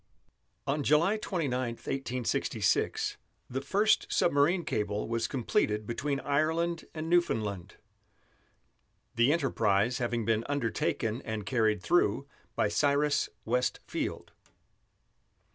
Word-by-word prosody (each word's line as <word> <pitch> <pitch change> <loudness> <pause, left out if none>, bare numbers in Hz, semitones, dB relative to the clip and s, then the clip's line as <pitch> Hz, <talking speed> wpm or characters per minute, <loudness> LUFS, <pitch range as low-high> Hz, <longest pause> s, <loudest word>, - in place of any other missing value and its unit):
On 145 +2 0
July 160 +9 +3
29, 130 - -2
1866, 125 -1 -1 0.3
the 130 +2 -3
first 205 +9 +2
submarine 170 +3 +3
cable 105 -1 -2
was 115 0 -1
completed 110 -4 0
between 135 +5 -2
Ireland 160 +4 0
and 155 0 -4
Newfoundland, 110 - 0 1.4
the 120 +4 +3
enterprise 120 -6 +1
having 120 -2 -1
been 115 -1 +1
undertaken 115 -3 -1
and 110 -2 -4
carried 110 -3 +1
through 140 -6 +2 0.3
by - - +2
Cyrus 145 +5 +2 0.2
West 125 +2 0
Field. - - -4
130 Hz, 100 wpm, -30 LUFS, 110-150 Hz, 1.4 s, July